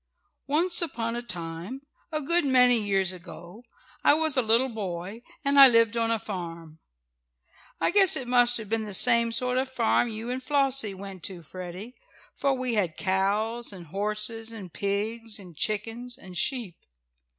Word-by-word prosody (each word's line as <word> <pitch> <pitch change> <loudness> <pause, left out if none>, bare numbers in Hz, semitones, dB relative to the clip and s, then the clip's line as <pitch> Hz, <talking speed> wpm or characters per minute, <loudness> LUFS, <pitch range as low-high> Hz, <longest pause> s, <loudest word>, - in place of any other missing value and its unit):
Once 340 +6 +1
upon 230 -8 -2
a 240 - -3
time, 175 +3 -5 0.3
a 305 -1 -2
good 340 +5 +2
many 250 -3 +5
years 195 -3 +1
ago, 175 +3 -11 0.4
I - - +6
was 315 -2 0
a 260 - +4
little 230 +3 +3
boy, 195 -2 -5 0.3
and 280 0 +4
I 275 - +12
lived 230 -2 +4
on 230 -1 +1
a 230 - +2
farm. 170 -6 -7 1.0
I - - +1
guess 390 -1 +4
it 255 - -3
must 245 -1 +5
have 220 -2 -6
been 220 +1 -1
the 205 -2 -3
same 235 +2 +4
sort 250 +2 0
of 265 - -1
a - - -20
farm 240 -1 +2
you 225 +2 -5
and 255 +1 -3
Flossie 270 -6 +1
went 190 -1 -8
to, 180 -3 -6
Freddie, 185 - -8 0.4
for 275 -1 0
we 255 -2 -2
had 185 -7 0
cows 210 +5 0
and 185 -3 -10
horses 215 +3 -2
and 195 -7 -8
pigs 215 +3 -3
and 180 -5 -12
chickens 225 +7 -3
and 185 -8 -12
sheep. 215 - -1
225 Hz, 175 wpm, -27 LUFS, 195-250 Hz, 1.0 s, I